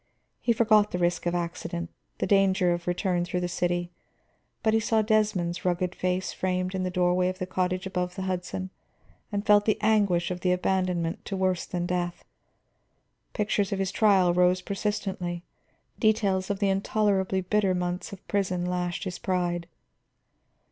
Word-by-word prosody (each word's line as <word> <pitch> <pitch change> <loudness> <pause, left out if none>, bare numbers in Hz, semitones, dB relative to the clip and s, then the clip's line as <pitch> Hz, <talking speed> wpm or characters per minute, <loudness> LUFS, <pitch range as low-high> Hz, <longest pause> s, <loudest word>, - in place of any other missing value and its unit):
He 240 - +1
forgot 215 -2 +4
the - - -3
risk 175 0 0
of 175 - 0
accident, 170 0 -4 0.3
the - - -1
danger 190 -2 +3
of 175 0 -4
the - - -1
return 175 -1 0
through 180 +1 -2
the 180 - -1
city, 175 0 -1 0.7
but 220 -1 +3
he 225 - +4
saw 220 0 +2
Desmond's 210 -5 +1
rugged 180 0 0
face 185 0 -1
framed 185 0 -1
in 190 - -1
the 185 - -1
doorway 180 0 +2
of 185 - -5
the 185 - -3
cottage 185 0 -1
above 180 -1 -2
the 190 - -4
Hudson 185 0 -3 0.6
and 205 0 -2
felt 205 -1 +5
the 215 - +2
anguish 200 -5 +2
of 180 - -3
the 180 0 +2
abandonment 180 -2 0
to 195 - -3
worse 185 -2 0
than 175 -1 -2
death. 175 -1 -2 1.1
Pictures 205 -1 0
of 200 - 0
his 195 -1 -1
trial 195 -5 +4
rose 180 +1 +3
persistently, 190 -3 -3 0.6
details 200 -4 +2
of 200 - 0
the 200 0 +1
intolerably 195 -1 +1
bitter 190 0 +1
months 180 +3 -3
of 200 - -11
prison 185 -3 0
lashed 180 0 -2
his 185 -3 -5
pride. 175 -2 -1
185 Hz, 170 wpm, -27 LUFS, 180-200 Hz, 1.1 s, felt